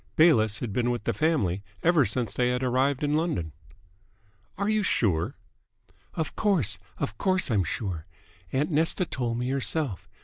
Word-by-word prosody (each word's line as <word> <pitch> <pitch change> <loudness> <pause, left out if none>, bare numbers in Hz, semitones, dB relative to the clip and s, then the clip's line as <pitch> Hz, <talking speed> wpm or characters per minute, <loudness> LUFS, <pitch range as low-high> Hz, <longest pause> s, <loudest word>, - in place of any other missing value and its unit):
Bayliss 110 -10 +4
had 115 -5 -3
been 120 +2 +1
with 120 -1 -2
the - - 0
family 110 - +1 0.2
ever 165 -7 +4
since 110 -1 0
they 125 -1 +1
had 125 +1 -1
arrived 130 +3 +1
in 145 0 +1
London. 150 - -1 1.1
"Are 200 +1 -1
you 215 0 +2
sure?" 90 - +1 0.8
"Of 160 - -3
course, 145 - +2 0.2
of 110 +1 -4
course 185 -7 +1
I'm 100 -4 +3
sure. 85 -2 -4 0.4
Aunt 145 +6 0
Nesta 165 +4 +2
told 120 -6 -2
me 125 +2 -1
herself. 135 - -2
125 Hz, 160 wpm, -27 LUFS, 110-160 Hz, 1.1 s, Bayliss